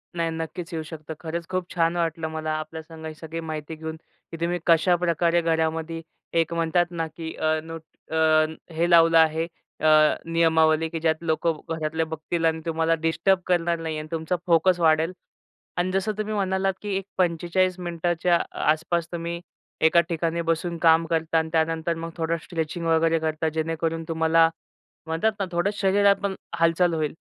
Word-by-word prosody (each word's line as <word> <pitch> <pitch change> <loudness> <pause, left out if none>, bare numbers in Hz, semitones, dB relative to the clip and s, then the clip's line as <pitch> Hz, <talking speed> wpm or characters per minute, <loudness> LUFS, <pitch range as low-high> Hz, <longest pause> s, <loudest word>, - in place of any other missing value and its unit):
नाही 165 -1 0
नक्कीच 165 +2 -5
येऊ 160 -1 -3
शकतं. 155 0 -8
खरंच 170 +1 -5
खूप 185 -1 -2
छान 165 0 +2
वाटलं 165 -1 -1
मला 155 0 -3
आपल्या 155 +1 -6
संग 160 0 -11
ही 155 - -5
सगळी 160 +1 -7
माहिती 160 -1 -5
घेऊन, 160 0 -6 0.4
की 165 - -6
तुम्ही 175 +1 0
कशाप्रकारे 170 0 +3
घरामध्ये 165 0 -1 0.4
एक 165 0 0
म्हणतात 170 +1 +2
ना, 165 -1 -2
की 160 +1 -7
अ, 155 0 +1
नोट 165 0 -8 0.3
अ, 155 -1 +4 0.3
हे 170 +2 +1
लावलं 165 -1 +6
आहे, 160 0 +4 0.4
अ, - - +4 0.4
नियमावली 160 -1 +3
की 165 0 -4
ज्यात 160 0 +2
लोकं 160 0 0 0.2
घरातले 160 +1 -1
बघतील 160 +1 -3
आणि 160 0 +1
तुम्हाला 165 0 +1
डिस्टर्ब 170 +4 +2
करणार 170 -1 +1
नाही 160 -1 -3
आणि 155 - -7
तुमचा 165 +2 -1
फोकस 175 +2 +4
वाढेल 160 +1 +3 0.7
आणि 180 +1 0
जसं 195 +3 0
तुम्ही 215 0 -2
म्हणालात 190 -1 0
की 210 - -5
एक 195 - -4
45 180 +1 +1
मिनिटाच्या 175 0 +1 0.3
आसपास 165 +1 -1
तुम्ही 170 0 -4 0.5
एका 170 +1 +6
ठिकाणी 170 0 -1
बसून 165 +1 -1
काम 165 0 +5
करता 165 0 0
आणि 160 0 0
त्यानंतर 165 +1 +1
मग 165 +1 -5
थोडं 165 0 0
स्ट्रेचिंग 165 0 -4
वगैरे 165 0 +3
करता. 160 0 -1
जेणेकरून 165 +1 -2
तुम्हाला 165 0 +4 0.6
म्हणतात 165 +8 +1
ना, 195 - 0
थोडं 175 +3 +1
शरीरात 200 0 +3
पण 195 -1 -1 0.2
हालचाल 165 +1 +3
होईल 155 -2 -1
165 Hz, 165 wpm, -25 LUFS, 160-170 Hz, 0.7 s, लावलं